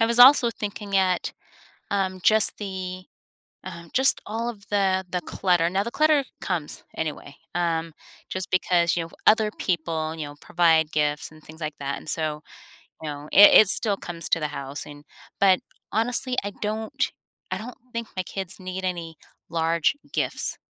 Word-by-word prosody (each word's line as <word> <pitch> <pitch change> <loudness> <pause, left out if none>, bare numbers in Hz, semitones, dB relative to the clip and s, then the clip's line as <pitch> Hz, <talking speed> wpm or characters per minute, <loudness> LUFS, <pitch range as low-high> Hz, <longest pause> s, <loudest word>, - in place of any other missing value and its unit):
I 225 - +5
was 235 +1 0
also 250 -1 +8
thinking 205 -2 -4
at, 185 -2 +1 0.6
um, 190 -2 0
just 215 -1 +4
the, 185 -2 -5 0.6
um 170 -2 -9
just 265 +1 +3
all 225 +3 -3
of 205 -4 -8
the 190 -2 +2
the 180 - -1
clutter, 175 0 +1
now 190 +3 0
the 235 - -4
clutter 305 0 +3 0.2
comes 170 -5 -4
anyway, 150 -3 -5 0.2
um, 165 -1 -1 0.4
just 185 -1 -4
because, 175 -2 +2
you 170 - 0
know, 165 - -11 0.2
other 215 -1 +5
people, 160 -3 -1
you 160 - -4
know, 145 - -9
provide 165 -2 +3
gifts 150 -1 0
and 155 0 -17
things 160 +2 -13
like 155 -1 -3
that, 140 0 -3
and - - -12
so, 155 -1 -2 0.6
you 155 - -4
know, 145 +1 -7
it 205 - +9
it 215 - +2
still 205 0 +3
comes 170 -3 -7
to 165 - +3
the 150 - -1
house, 140 0 -6
and 145 0 -12 0.3
but, 190 -2 +5 0.3
honestly, 245 +3 0
I 200 - -3
don't 215 +1 -2 0.4
I - - -1
don't 240 +3 -8 0.2
think 230 -1 -4
my 185 - 0
kids 190 +1 -6
need 185 0 -5
any 170 -3 -3 0.3
large 165 - +1 0.2
gifts, - - -2
185 Hz, 175 wpm, -25 LUFS, 160-205 Hz, 0.6 s, it